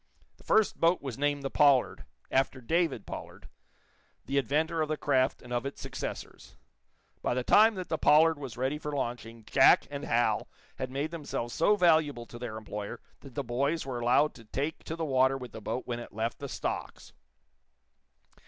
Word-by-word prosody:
The -, -, -20 dB
first 220 Hz, -1 st, +2 dB
boat 170 Hz, +2 st, +3 dB
was 135 Hz, -2 st, -5 dB
named 145 Hz, -1 st, 0 dB
the 135 Hz, -, -3 dB
"Pollard," 140 Hz, -4 st, +3 dB, 0.3 s
after 130 Hz, 0 st, +1 dB
David 155 Hz, -, 0 dB
Pollard, -, -, -9 dB, 0.8 s
the 140 Hz, +1 st, +1 dB
inventor 155 Hz, +5 st, 0 dB
of 155 Hz, -, -1 dB
the 155 Hz, -, -1 dB
craft 130 Hz, -3 st, +1 dB
and 125 Hz, 0 st, -7 dB
of 120 Hz, -, 0 dB
its 140 Hz, 0 st, -6 dB
successors. -, -, -7 dB, 0.7 s
By -, -, 0 dB
the 125 Hz, -, -1 dB
time 215 Hz, -, +6 dB
that 185 Hz, -1 st, -5 dB
the 160 Hz, -, -1 dB
"Pollard" 160 Hz, 0 st, +5 dB
was 130 Hz, -6 st, -7 dB
ready 135 Hz, +4 st, -1 dB
for 150 Hz, -, -5 dB
launching 115 Hz, -4 st, -4 dB
Jack -, -, +5 dB
and -, -, -5 dB
Hal -, -, +1 dB, 0.3 s
had 130 Hz, -1 st, -3 dB
made 140 Hz, +4 st, -3 dB
themselves 145 Hz, -7 st, -4 dB
so 205 Hz, +6 st, +3 dB
valuable 155 Hz, -9 st, +3 dB
to 120 Hz, -, -11 dB
their 115 Hz, -3 st, -5 dB
employer 105 Hz, -1 st, -6 dB, 0.2 s
that 135 Hz, -4 st, -14 dB
the 140 Hz, -, -2 dB
boys 140 Hz, +6 st, -1 dB
were 130 Hz, -3 st, -4 dB
allowed 125 Hz, +5 st, +3 dB
to 115 Hz, -, -15 dB
take 140 Hz, +8 st, -3 dB
to 160 Hz, -, -4 dB
the 165 Hz, -1 st, -3 dB
water 130 Hz, -1 st, +3 dB
with 125 Hz, -3 st, -8 dB
the 110 Hz, -, -9 dB
boat 115 Hz, +5 st, -3 dB
when 120 Hz, -1 st, -3 dB
it 120 Hz, -, -9 dB
left 115 Hz, +2 st, -3 dB
the 140 Hz, -, -6 dB
stocks. -, -, -5 dB
135 Hz, 190 wpm, -29 LUFS, 120-155 Hz, 0.8 s, time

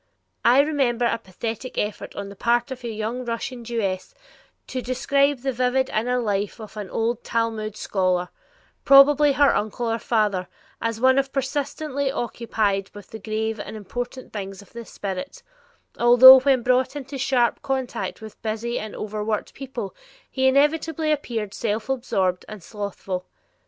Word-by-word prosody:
I 250 Hz, +4 st, +6 dB
remember 270 Hz, -5 st, +1 dB
a 230 Hz, 0 st, +1 dB
pathetic 225 Hz, +6 st, -6 dB
effort 210 Hz, 0 st, -3 dB
on 200 Hz, 0 st, -5 dB
the 200 Hz, -, -10 dB
part 240 Hz, +5 st, +1 dB
of 255 Hz, -1 st, -7 dB
a -, -, -4 dB
young 225 Hz, +3 st, -3 dB
Russian 240 Hz, +1 st, -4 dB
Jewess 210 Hz, -6 st, -3 dB, 0.5 s
to 255 Hz, -, -4 dB
describe 275 Hz, +3 st, +1 dB
the 270 Hz, +1 st, -1 dB
vivid 255 Hz, +1 st, 0 dB
inner 245 Hz, +3 st, 0 dB
life 205 Hz, -2 st, -1 dB
of 215 Hz, -2 st, -10 dB
an 205 Hz, -3 st, -6 dB
old 230 Hz, +1 st, -1 dB
Talmud 220 Hz, -2 st, -2 dB
scholar, 185 Hz, -2 st, 0 dB, 0.5 s
probably 280 Hz, +1 st, +7 dB
her 280 Hz, +1 st, +4 dB
uncle 215 Hz, +3 st, -2 dB
or 225 Hz, -, -1 dB
father, 210 Hz, -6 st, 0 dB, 0.3 s
as 230 Hz, -1 st, -1 dB
of 230 Hz, -, -9 dB
one 260 Hz, +1 st, +5 dB
persistently 280 Hz, +1 st, -2 dB
occupied 220 Hz, -6 st, -1 dB
with 205 Hz, -2 st, -12 dB
the 220 Hz, -, -7 dB
grave 220 Hz, +1 st, -2 dB
and 210 Hz, +1 st, -7 dB
important 245 Hz, +5 st, -6 dB
things 195 Hz, -2 st, -6 dB
of -, -, -23 dB
the 235 Hz, 0 st, -8 dB
spirit, 195 Hz, -, -6 dB, 0.6 s
although 245 Hz, +2 st, +10 dB
when 260 Hz, -2 st, +2 dB
brought 255 Hz, +2 st, +2 dB
into 275 Hz, -1 st, -6 dB
sharp 245 Hz, -3 st, +1 dB
contact 265 Hz, -4 st, -3 dB
with 220 Hz, -1 st, -11 dB
busy 225 Hz, +2 st, -2 dB
and 215 Hz, 0 st, -7 dB
overworked 215 Hz, 0 st, -3 dB
people, 255 Hz, -7 st, -6 dB, 0.4 s
he 265 Hz, 0 st, +2 dB
inevitably 310 Hz, +3 st, +2 dB
appeared 230 Hz, -8 st, -2 dB
self 215 Hz, +1 st, -2 dB
absorbed 190 Hz, -8 st, 0 dB
and 215 Hz, -4 st, -9 dB
slothful. 195 Hz, -3 st, -5 dB
235 Hz, 155 wpm, -23 LUFS, 215-265 Hz, 0.6 s, although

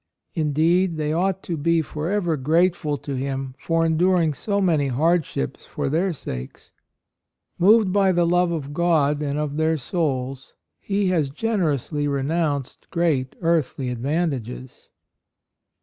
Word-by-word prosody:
Indeed 165 Hz, +3 st, +2 dB
they 155 Hz, 0 st, -1 dB
ought 190 Hz, +3 st, 0 dB
to 170 Hz, -, -3 dB
be 165 Hz, +2 st, +1 dB
forever 170 Hz, +3 st, -1 dB
grateful 155 Hz, +1 st, +1 dB
to 140 Hz, -, -6 dB
him 135 Hz, 0 st, -3 dB
for 165 Hz, 0 st, +1 dB
enduring 165 Hz, 0 st, +2 dB
so 200 Hz, +8 st, -2 dB
many 160 Hz, -7 st, +2 dB
hardships 150 Hz, -, 0 dB
for -, -, -3 dB
their 175 Hz, +6 st, +1 dB
sakes. 65 Hz, -, -8 dB, 0.9 s
Moved 205 Hz, +1 st, +5 dB
by 195 Hz, -2 st, +4 dB
the 175 Hz, -1 st, +2 dB
love 175 Hz, +1 st, +3 dB
of 145 Hz, -4 st, -4 dB
God 150 Hz, -3 st, +2 dB
and 145 Hz, -1 st, -2 dB
of 150 Hz, -1 st, -2 dB
their 160 Hz, 0 st, +2 dB
souls, 135 Hz, -3 st, -3 dB, 0.2 s
he 200 Hz, -1 st, 0 dB
has 160 Hz, -6 st, +1 dB
generously 150 Hz, -, -1 dB
renounced 145 Hz, 0 st, -2 dB
great 155 Hz, -7 st, 0 dB
earthly 160 Hz, -6 st, 0 dB
advantages. 130 Hz, -1 st, -3 dB
160 Hz, 130 wpm, -23 LUFS, 140-175 Hz, 0.9 s, Moved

